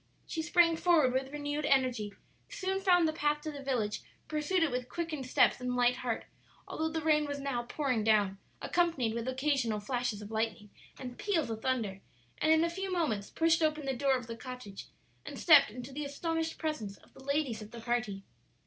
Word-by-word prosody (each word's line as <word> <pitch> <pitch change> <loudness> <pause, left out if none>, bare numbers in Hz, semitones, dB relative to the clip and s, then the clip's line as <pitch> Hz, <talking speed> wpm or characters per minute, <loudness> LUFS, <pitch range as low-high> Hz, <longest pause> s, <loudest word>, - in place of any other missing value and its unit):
she 325 - -3
sprang 335 0 +4
forward 320 -7 +4
with 265 +1 -1
renewed 290 0 -3
energy, 255 -7 +2 0.4
soon 385 -5 -2
found 355 -4 +5
the 315 - -1
path 295 -1 +1
to 310 +1 -5
the 285 -1 -8
village, 240 -6 -1 0.3
pursued 315 +4 +1
it 315 - +1
with 250 0 -3
quickened 310 -4 -4
steps 255 - +3
and 250 0 -1
light 245 0 +3
heart, 240 -3 -3 0.4
although 320 0 -2
the 320 0 -3
rain 300 -1 +4
was 285 0 -4
now 275 -3 -1
pouring 250 -2 -1
down, 205 -3 +3 0.2
accompanied 325 -10 +1
with 235 +1 -3
occasional 260 -4 0
flashes 240 0 -2
of 210 0 -9
lightning 220 -2 -2 0.3
and 250 -2 -8
peals 365 - 0
of 220 0 -5
thunder, 225 -7 -1 0.4
and 310 - +3
in 320 0 +5
a - - +3
few 385 +2 -4
moments 260 - -1
pushed 330 0 +2
open 305 -2 +1
the 270 - 0
door 270 +1 +2
of 250 - -7
the 230 0 -6
cottage 250 -5 -8 0.4
and - - -8
stepped 290 -6 +7
into 250 +4 -8
the 300 +2 -3
astonished 325 +3 -2
presence 230 -11 -3
of - - -23
the 265 - -14
ladies 280 -5 -1
of 210 - -9
the 235 - -9
party. 225 -4 -2
270 Hz, 200 wpm, -31 LUFS, 235-315 Hz, 0.4 s, stepped